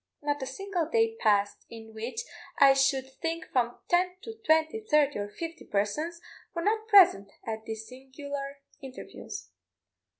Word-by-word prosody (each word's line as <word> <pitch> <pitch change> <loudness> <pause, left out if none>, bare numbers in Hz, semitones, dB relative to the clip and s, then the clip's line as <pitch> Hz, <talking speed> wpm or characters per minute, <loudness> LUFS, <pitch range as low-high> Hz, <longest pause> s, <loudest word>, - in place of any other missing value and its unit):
Not 290 -1 -1
a 265 - -3
single 355 +3 -2
day 450 +1 +2
passed 205 -2 +2
in 225 -1 -11
which 230 - -4 0.4
I 275 -1 +8
should 270 -1 +1
think 330 -1 -2
from 245 -2 +1
ten 360 +1 +2
to 450 - -6
twenty, 315 +4 +3
thirty, 300 - +2
or 205 0 -3
fifty 330 +8 -7
persons, 300 +13 -1 0.4
were 335 - -2
not 435 +2 +1
present 360 - +7 0.2
at 220 -1 -4
these 220 0 -6
singular 275 +2 -7 0.2
interviews. 265 -1 -9
280 Hz, 145 wpm, -29 LUFS, 235-335 Hz, 0.4 s, I